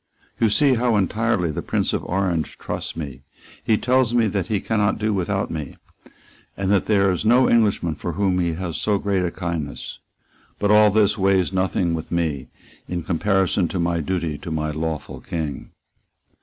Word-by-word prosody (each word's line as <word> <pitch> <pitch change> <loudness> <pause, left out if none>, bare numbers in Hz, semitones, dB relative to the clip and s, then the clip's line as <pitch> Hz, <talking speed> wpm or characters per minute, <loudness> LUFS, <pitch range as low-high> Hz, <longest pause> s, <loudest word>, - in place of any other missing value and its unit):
"You 115 - +3
see 135 +6 +4
how 120 -1 +2
entirely 105 -3 +1
the - - -4
Prince - - -1
of - - -1
Orange 90 -4 -1
trusts - - -5
me. 70 -5 -6 0.4
He 110 - +3
tells 125 -1 +2
me 115 -2 +4
that 95 -1 -2
he 110 -3 0
cannot 105 -1 0
do 110 0 0
without 95 +1 -1
me, 75 -5 -5 0.8
and 95 0 0
that 100 -2 +2
there 100 -3 +3
is 90 - -2
no 120 +4 +5
Englishman 105 -8 +2
for 85 +3 -5
whom 95 0 +1
he 85 -2 0
has 85 -1 -4
so 105 -1 +1
great 100 -2 0
a 90 - 0
kindness; 85 -5 -5 0.6
but 105 0 +1
all 105 0 +7
this 105 0 +2
weighs 95 -1 +2
nothing 95 -2 0
with 80 -1 -5
me 80 -6 -1 0.4
in 90 -1 -3
comparison 95 0 +1
of 90 - +1
my 85 0 0
duty 80 -2 -2
to - - -7
my 75 -1 -2
lawful 80 0 -4
King." 80 -5 -5
95 Hz, 180 wpm, -22 LUFS, 85-105 Hz, 0.8 s, all